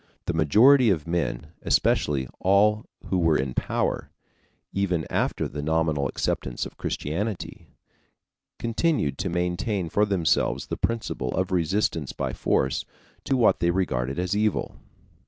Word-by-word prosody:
The 85 - -1
majority 115 - +5
of 80 -7 +1
men, 80 -4 -2
especially 70 -3 +1
all 105 +3 +3 0.2
who 95 - +1
were 80 -3 +3
in 65 -1 -2
power, - - -1 0.6
even 90 -5 0
after - - 0
the 75 - -6
nominal 80 -2 +1
acceptance 65 -1 -2
of - - -10
Christianity, 95 +7 -4 0.9
continued 115 - 0
to 95 0 -1
maintain 90 +2 -1
for 105 +5 +2
themselves 90 -5 +1
the - - -4
principle 115 - -2
of 95 +1 -1
resistance 85 -4 0
by - - -3
force 65 - 0 0.4
to 135 - +1
what 120 - +4
they 85 - +2
regarded 70 -8 -1
as 90 +2 -1
evil. 105 0 0
90 Hz, 135 wpm, -25 LUFS, 75-105 Hz, 0.9 s, majority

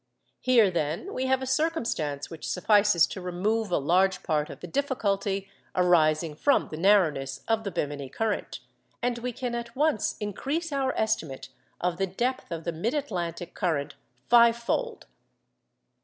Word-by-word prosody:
Here, 235 -6 +4
then, 170 - -2
we 260 +1 -1
have 265 0 +2
a - - -2
circumstance 245 - -1
which 165 - -6
suffices 205 -2 +4
to 190 - -7
remove 200 +5 -1
a 180 - +2
large 185 +6 +2
part 150 -2 0
of - - -9
the - - -7
difficulty 200 -5 -1 0.3
arising 165 -3 +3
from 280 - +2
the 155 - -6
narrowness 160 -8 +2
of 225 -1 +1
the 200 - -2
Bemini 145 -5 -3
current, 220 +7 -2 0.4
and 245 -1 0
we 250 +1 -3
can 245 0 -4
at 235 +1 -5
once 295 -5 +1
increase 280 - -3
our 270 -2 0
estimate 155 -13 -1 0.3
of 175 -1 -1
the 195 +1 0
depth 240 +4 -2
of 165 -1 -4
the 170 - -2
mid 190 - -2
Atlantic 175 - -3
current 160 -7 -1 0.3
fivefold. 235 - +3
200 Hz, 155 wpm, -27 LUFS, 170-245 Hz, 0.4 s, Here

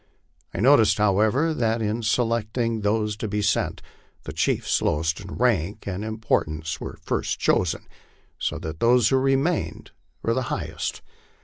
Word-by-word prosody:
I - - -5
noticed, 125 -3 +5
however, 110 +10 +2
that 115 -4 0
in 110 +1 -1
selecting 115 0 0
those 105 0 0
to 110 - -3
be 105 0 -1
sent, 105 - 0 0.4
the - - -7
chiefs - - +1
lowest 80 +2 0
in 100 0 -8
rank 105 -6 0
and 100 +1 -4
importance 85 -8 -2
were - - -6
first - - -1
chosen, 90 -3 +1 0.5
so - - -1
that 80 0 -6
those 120 -1 +4
who 135 - +3
remained 135 +5 0 0.3
were 115 - +1
the 130 - 0
highest. - - -4
110 Hz, 145 wpm, -24 LUFS, 100-120 Hz, 0.5 s, noticed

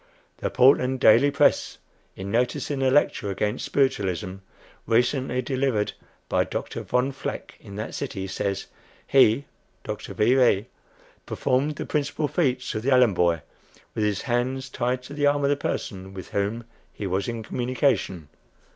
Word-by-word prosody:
The - - -2
"Portland 130 0 +4
Daily 120 +6 +6
Press," - - +2 0.4
in 95 +1 -6
noticing 125 +4 0
a 130 - +3
lecture 130 -6 +2
against 105 +2 -2
Spiritualism, 95 -9 0 0.5
recently 125 +2 +1
delivered 130 -5 0 0.3
by - - +2
Dr. - - -5
Von 125 +2 0
Vleck, 135 - -6
in 100 - -11
that 110 +2 -5
city, 105 -9 -4
says: 95 0 -3 0.4
"He 135 0 +4 0.4
(Dr. - - -6
V. 110 +4 +3
V.) 120 -6 +4 0.6
performed 140 +4 0
the - - -5
principal 150 0 -1
feats 130 -6 0
of 110 - -3
the 130 - -1
Allen 125 -5 +5
boy, 85 -3 +1 0.5
with 110 - -1
his 105 -2 0
hands 130 +2 -1
tied 125 0 -1
to 140 - -10
the 145 0 +2
arm 145 0 +2
of 140 - +3
the - - +3
person 95 -8 -4
with 95 -3 -8
whom 105 +4 -2 0.3
he 105 - -6
was 95 +1 -1
in 115 -2 -4
communication." 120 - -1
125 Hz, 155 wpm, -25 LUFS, 100-135 Hz, 0.6 s, Daily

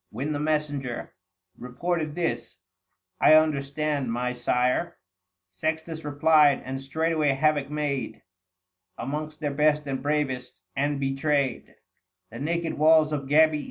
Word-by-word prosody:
When 135 +7 -4
the 145 - -2
messenger 145 -5 -2 0.5
Reported 155 +5 -3
this 165 - -3 0.2
— 90 0 -53
" 90 0 -29
I 155 - +7
understand 145 -3 +1
my 125 +1 -1
sire," 125 +6 0 0.6
Sextns 160 - -3
replied, 145 -1 +4
and 135 +1 -5
straightway 155 +1 0
havoc 145 0 +1
made 145 -5 -3 0.7
Amongst 150 +2 -5
their 145 -2 -1
best 150 +1 +2
and 135 -2 -3
bravest, 135 -8 -2 0.2
and 145 +1 0
betrayed 135 -1 0
760 - - -26 0.5
The 115 - -8
naked 165 +2 -2
walls 155 0 +5
of 140 -2 -3
Gabii. 155 +1 +4
145 Hz, 130 wpm, -26 LUFS, 135-155 Hz, 0.7 s, I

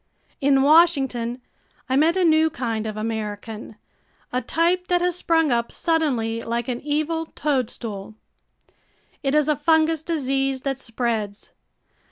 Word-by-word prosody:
In 275 -1 +4
Washington 270 -6 +3 0.4
I 260 - 0
met 320 +6 +3
a 375 - +3
new 320 0 +4
kind 230 -8 -3
of 215 0 -5
American, 215 0 -5 0.6
a 250 - +1
type 345 +8 +1
that 355 0 +2
has 355 -1 0
sprung 325 -4 +2
up 235 -1 0
suddenly 255 -9 0
like 235 +1 -3
an 245 -2 -3
evil 310 +2 -1
toadstool. 230 -7 -3 1.1
It 275 +1 0
is 300 -1 +3
a 300 - +3
fungous 320 +1 +2
disease 270 -4 -1
that 270 -1 -3
spreads. 225 -4 -3
270 Hz, 135 wpm, -23 LUFS, 230-320 Hz, 1.1 s, In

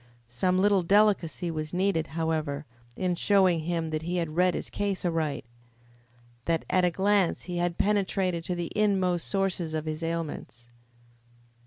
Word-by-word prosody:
Some 125 +11 0
little 200 0 +4
delicacy 185 -3 +2
was 155 +1 -4
needed, 180 -4 +1
however, 155 -3 -1 0.3
in 180 +4 0
showing 185 -1 +3
him 165 0 -2
that 155 0 -2
he 175 +2 -3
had 165 -3 -2
read 180 +1 +3
his - - -5
case 200 -2 -2
aright 160 -6 -1 1.0
that 165 -1 0
at 185 - +3
a 180 - +4
glance 195 0 +1
he 180 -1 -5
had 175 -1 -1
penetrated 190 -4 0
to 180 - -2
the 175 -1 -4
inmost 190 -5 +1
sources 185 -5 -1
of 155 0 -3
his 155 0 -4
ailments. 165 -7 -5
175 Hz, 155 wpm, -27 LUFS, 160-190 Hz, 1.0 s, little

